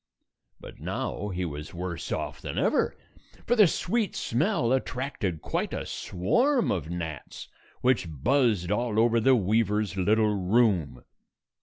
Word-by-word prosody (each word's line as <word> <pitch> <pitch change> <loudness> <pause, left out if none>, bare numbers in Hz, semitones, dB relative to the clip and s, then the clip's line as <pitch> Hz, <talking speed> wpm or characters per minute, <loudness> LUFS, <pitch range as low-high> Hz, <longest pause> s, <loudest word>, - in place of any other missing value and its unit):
But - - -12
now 105 - -3
he 90 -1 -2
was 75 0 -7
worse 85 -1 -5
off - - -3
than - - -5
ever, - - +1 0.5
for 240 - +2
the 210 -5 +7
sweet 210 +6 -1
smell 125 - 0
attracted 125 - -2
quite - - -2
a - - -4
swarm 240 - +1
of 85 -5 -2
gnats, 80 -5 -6 0.3
which 125 -7 +2
buzzed 105 - +1
all 115 0 0
over 115 0 +4
the 130 +3 +5
weaver's 105 -1 +1
little 105 +3 +3
room. 95 - +1
105 Hz, 135 wpm, -27 LUFS, 90-125 Hz, 0.5 s, the